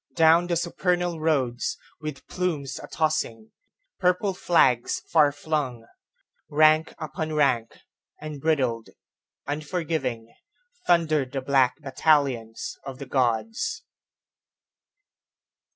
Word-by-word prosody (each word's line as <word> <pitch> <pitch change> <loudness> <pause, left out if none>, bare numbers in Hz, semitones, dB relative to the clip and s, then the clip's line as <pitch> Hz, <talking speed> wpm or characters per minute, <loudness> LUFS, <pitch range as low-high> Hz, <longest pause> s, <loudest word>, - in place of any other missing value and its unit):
Down 165 +1 +5
the 175 - 0
supernal 175 0 -1
roads, 135 -6 0 0.2
With 155 -2 -7
plumes 155 -7 -3
a - - -9
tossing, 155 -9 -1 0.5
purple 180 +2 +2
flags 130 -10 +2
far 150 -3 +4
flung, 145 -5 -3 0.6
Rank 155 +1 +4
upon 155 +1 -4
rank, 130 -7 +1 0.4
unbridled, 140 -6 -1 0.6
unforgiving, 145 -6 -3 0.5
Thundered 155 -6 +2
the 135 - -2
black 130 -2 +3
battalions 135 -5 0
of 135 -1 -7
the 140 - -7
Gods. 130 - -1
150 Hz, 90 wpm, -25 LUFS, 130-160 Hz, 0.6 s, Down